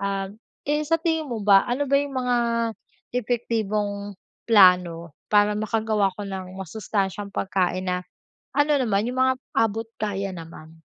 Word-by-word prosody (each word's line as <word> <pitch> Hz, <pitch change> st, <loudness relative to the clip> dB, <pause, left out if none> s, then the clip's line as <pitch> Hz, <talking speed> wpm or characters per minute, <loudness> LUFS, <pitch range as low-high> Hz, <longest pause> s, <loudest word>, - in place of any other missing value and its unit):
Ah, 195 Hz, -1 st, -2 dB, 0.4 s
eh, 300 Hz, +1 st, +1 dB
sa 330 Hz, +2 st, +1 dB
tingin 320 Hz, -2 st, 0 dB
mo 230 Hz, -2 st, -3 dB
ba 195 Hz, -1 st, +6 dB
ano 265 Hz, +4 st, 0 dB
ba 280 Hz, -, +4 dB
'yung 280 Hz, 0 st, -1 dB
mga 250 Hz, -1 st, +1 dB, 0.8 s
epektibong 215 Hz, -4 st, -1 dB, 0.4 s
plano 180 Hz, -6 st, +4 dB, 0.2 s
para 210 Hz, 0 st, +4 dB
makagawa 215 Hz, -2 st, 0 dB
ako 205 Hz, -1 st, -6 dB
ng 185 Hz, -1 st, -6 dB
masustansiyang 200 Hz, +1 st, -3 dB
pagkain 185 Hz, -1 st, -1 dB
na, 180 Hz, 0 st, +1 dB, 0.6 s
ano 290 Hz, +1 st, +4 dB
naman 215 Hz, -5 st, +1 dB
'yung 255 Hz, -, -3 dB
mga 260 Hz, 0 st, +4 dB, 0.2 s
abot 225 Hz, 0 st, +1 dB, 0.2 s
kaya 195 Hz, -2 st, -2 dB
naman? 160 Hz, -1 st, -11 dB
205 Hz, 140 wpm, -24 LUFS, 190-240 Hz, 0.8 s, ba